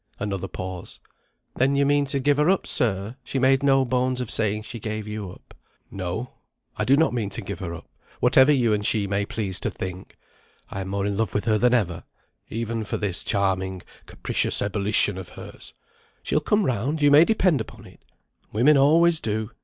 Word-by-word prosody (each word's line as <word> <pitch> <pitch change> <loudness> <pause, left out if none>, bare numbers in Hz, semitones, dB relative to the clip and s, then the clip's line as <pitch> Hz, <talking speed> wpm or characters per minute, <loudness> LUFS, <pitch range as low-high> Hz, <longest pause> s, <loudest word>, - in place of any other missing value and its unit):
Another 95 -2 -3
pause. 90 0 -7 0.6
"Then 135 +2 +2
you 140 0 +3
mean 145 0 +3
to 140 0 -1
give 145 +1 +2
her 150 +3 +3
up, 195 - +2
sir? 105 +1 -1
She 135 - -4
made 135 +1 +3
no 135 -1 +3
bones 125 +1 0
of 125 -3 -4
saying 110 -1 0
she 115 +1 -8
gave 110 0 -4
you 105 -2 -5
up." - - -17 0.4
"No, 95 +6 -4 0.4
I - - -1
do 135 +2 +4
not 160 -4 +3
mean 110 -5 -2
to - - -5
give 100 - -6
her 85 -3 -5
up, - - -12 0.3
whatever 135 +2 +5
you 120 -6 +3
and 105 -1 -1
she 105 -1 +1
may 100 +1 -1
please 95 -4 -3
to - - -2
think. 95 0 -7 0.5
I 95 - -4
am 95 - -5
more 100 +1 -2
in 100 -1 -1
love 110 0 -1
with 105 - 0
her 110 -2 +2
than 125 +2 +4
ever; 90 -7 -1 0.5
even 115 0 -3
for 105 - -3
this 100 -4 -2
charming 95 -2 -1 0.2
capricious - - -1
ebullition 100 -1 +1
of 95 - -8
hers. - - -10 0.5
She'll - - +1
come 205 +6 +1
round, 130 - -1
you 145 - +6
may 150 +3 +8
depend 185 - +2
upon - - -10
it. - - -17 0.5
Women 135 +7 +4
always 160 +4 +4
do. 110 -1 -3
110 Hz, 200 wpm, -24 LUFS, 100-135 Hz, 0.6 s, may